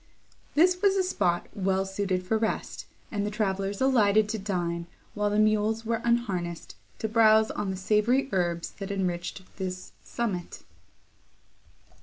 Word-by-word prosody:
This 360 +4 +4
was 400 -1 +4
a 380 - +2
spot 175 - 0
well 195 -1 0
suited 190 -1 -2
for 220 - +1
rest, 220 - -3 0.2
and 205 -2 -1
the 205 - -1
travellers 195 -2 -1
alighted 215 -5 +4
to 220 0 -2
dine, 175 -4 -2 0.3
while 210 0 0
the 205 - 0
mules 215 +1 +2
were 230 0 -1
unharnessed 195 -8 -1 0.2
to 220 - -2
browse 220 0 +5
on 210 -2 -3
the 190 - -3
savoury 215 +8 +2
herbs 175 -2 -1
that 195 0 -5
enriched 180 -1 -3
this 185 -1 -5
summit. 195 -7 -4
205 Hz, 145 wpm, -27 LUFS, 185-220 Hz, 0.3 s, browse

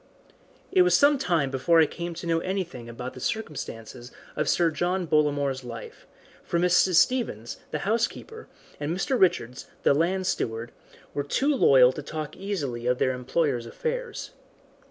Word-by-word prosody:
It 380 -1 +5
was 360 - +5
some 285 -1 +4
time 165 - +1
before 140 +5 +3
I 160 - +7
came 170 +2 -6
to 170 - -7
know 165 -1 +1
anything 175 -10 -4
about 125 +2 -7
the - - -10
circumstances 125 - -5 0.2
of - - 0
Sir 170 -2 +3
John 180 +3 -1
Bollamore's 145 -4 +1
life, 115 -2 -9 0.4
for 170 - -1
Mrs. 180 +1 +3
Stevens, 165 - +1
the 150 - -4
housekeeper, 235 - -2 0.3
and 145 +1 -2
Mr. 255 +6 0
Richards, 125 -9 +1 0.2
the - - +5
land 180 +5 +1
steward, 115 -8 -2 0.4
were 145 - -1
too 275 - +1
loyal 130 - +6
to 150 - -7
talk 155 +1 -6
easily 140 -12 -4
of 125 0 +2
their 130 - +2
employer's 125 -1 -1
affairs. 480 - -4
160 Hz, 155 wpm, -26 LUFS, 130-190 Hz, 0.4 s, I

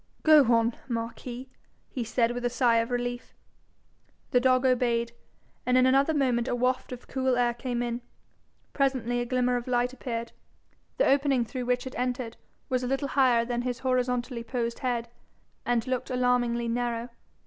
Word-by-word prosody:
'Go 300 -6 +6
on, 230 0 +3
Marquis,' 240 +2 -5 0.4
he 250 - -4
said, 230 +1 +1
with 245 0 -4
a 245 - +1
sigh 240 -1 +3
of 230 +1 +1
relief. 245 0 -3 1.0
The 250 - +5
dog 255 +1 +3
obeyed, 235 -2 +2 0.5
and 250 0 +2
in 255 - +5
another 275 +4 +3
moment 250 -4 +1
a - - 0
waft 255 +1 0
of 250 -1 -8
cool 260 -2 0
air 240 -1 +2
came 240 0 -3
in. 240 0 -3 0.7
Presently 260 -4 0
a 240 - -2
glimmer 250 0 +1
of 240 - -6
light 245 0 +1
appeared. 235 -3 -4 0.7
The - - +3
opening 275 -3 +3
through 250 +2 -5
which 250 +1 0
it 260 - -6
entered 250 -2 -2 0.3
was 255 -2 0
a 250 - -2
little 270 +2 -1
higher 250 -4 +3
than 240 0 -2
his 245 -1 -2
horizontally 250 -1 0
posed 235 -1 -3
head, 245 -3 -1 0.6
and 240 -1 +1
looked 255 -1 -2
alarmingly 245 -2 +1
narrow. 240 0 -2
245 Hz, 170 wpm, -27 LUFS, 235-255 Hz, 1.0 s, Go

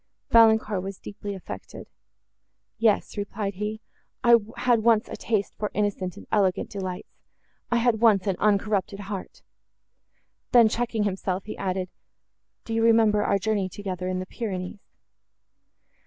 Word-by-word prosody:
Valancourt 220 -3 +5
was 195 0 -6
deeply 205 0 -7
affected. 190 - -9 0.9
"Yes," 220 -2 +2
replied 205 0 -3
he, 210 +3 -4 0.4
"I 235 -1 +7 0.2
had 245 -2 +3
once 225 -1 +3
a - - -6
taste 215 -3 -1
for 210 - -1
innocent 195 -3 -1
and - - -11
elegant 195 -4 +1
delights—I 190 +4 -7
had 235 -2 +2
once 210 -5 +5
an 195 -3 0
uncorrupted 200 -1 +1
heart." 195 -1 -7 1.1
Then, 235 -3 +7
checking 230 -1 -1
himself, 190 -1 -2
he 215 - -6
added, 185 -1 -2 0.8
"Do 225 - -4
you 225 - +1
remember 220 -2 +4
our 200 - +2
journey 200 -2 -1
together 185 -2 -5
in 185 0 -1
the 185 - -3
Pyrenees?" 190 -2 -5
205 Hz, 135 wpm, -25 LUFS, 190-220 Hz, 1.1 s, I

